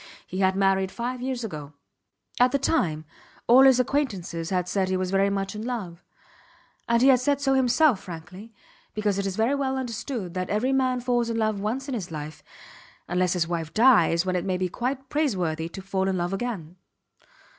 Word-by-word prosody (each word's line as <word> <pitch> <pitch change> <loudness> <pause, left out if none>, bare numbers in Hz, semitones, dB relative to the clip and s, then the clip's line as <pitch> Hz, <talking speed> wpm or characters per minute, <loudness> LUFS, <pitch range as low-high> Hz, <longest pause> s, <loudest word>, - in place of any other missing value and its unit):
He 185 - -6
had 190 -1 +2
married 195 -1 +2
five 245 +1 -4
years 255 -1 -3
ago. 150 -8 -7 0.7
At 250 +1 +5
the 280 - +2
time 170 - 0 0.4
all 245 +3 +7
his 260 -2 +6
acquaintances 195 - -1
had 180 -2 -1
said 190 0 0
he 185 - +1
was 185 0 -2
very 195 +1 +3
much 195 0 -2
in 210 - -6
love; 195 -8 -5 0.9
and 235 +1 +3
he 270 - +7
had 255 -2 +6
said 280 +2 +1
so 275 -1 +1
himself, 260 -1 +3
frankly, 185 +5 -10 0.4
because 210 -2 0
it 200 - -1
is 190 - -3
very 225 +6 +1
well 270 -1 -1
understood 235 -6 -4
that 185 0 -3
every 240 +6 +1
man 255 -2 +1
falls 240 -1 0
in 230 - -2
love 215 -2 0
once 240 +7 -3
in 275 - -4
his 200 -7 -4
life 155 -1 -7 0.7
unless 180 0 +1
his 175 -3 0
wife 165 -2 -4
dies, 215 -8 +5
when 185 -1 -1
it 180 - 0
may 185 -1 -1
be 185 0 -1
quite 260 +7 -3
praiseworthy 180 - -1
to 190 +2 -9
fall 190 0 -1
in 190 -1 0
love 175 +2 -2
again. 195 -6 -4
200 Hz, 200 wpm, -25 LUFS, 180-250 Hz, 0.9 s, all